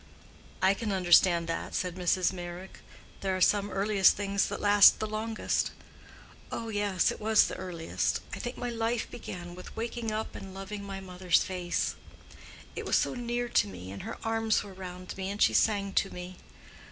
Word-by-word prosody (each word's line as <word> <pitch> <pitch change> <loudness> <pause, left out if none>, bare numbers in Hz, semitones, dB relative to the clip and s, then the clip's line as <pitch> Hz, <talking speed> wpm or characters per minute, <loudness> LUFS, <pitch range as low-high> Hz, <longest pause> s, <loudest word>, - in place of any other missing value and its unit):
"I 190 +1 +6
can 215 +1 -3
understand 175 -2 +5
that," 165 - -3
said 180 -1 -1
Mrs. 180 +1 +1
Meyrick. 175 +1 -8 0.4
"There 190 -1 -1
are - - -4
some 205 +2 +3
earliest 195 0 +4
things 200 0 0
that - - -4
last 205 -1 +7
the 215 - -1
longest." 215 +1 -1 0.8
"Oh, 230 -1 -4
yes, 205 -4 +1
it - - -8
was 220 0 +5
the - - -4
earliest. 175 -3 -2
I - - -4
think 245 +1 -5
my 245 - -3
life 230 0 -1
began 175 -6 -7
with 180 +1 -11
waking 230 0 -3
up 215 +1 -3
and 190 -1 -9
loving 200 +1 -6
my 195 -1 -6
mother's 180 -1 +1
face: 180 -2 -1 0.8
it - - -4
was - - +2
so - - +2
near 240 0 -2
to - - +3
me, 95 -1 -8
and 100 - -7
her - - -6
arms 225 -1 +1
were 200 - -10
round 185 -1 -8
me, 190 0 -3
and 200 +1 -5
she - - +4
sang 200 -2 +2
to 195 - +2
me. 180 +1 -8
195 Hz, 185 wpm, -29 LUFS, 180-215 Hz, 0.8 s, last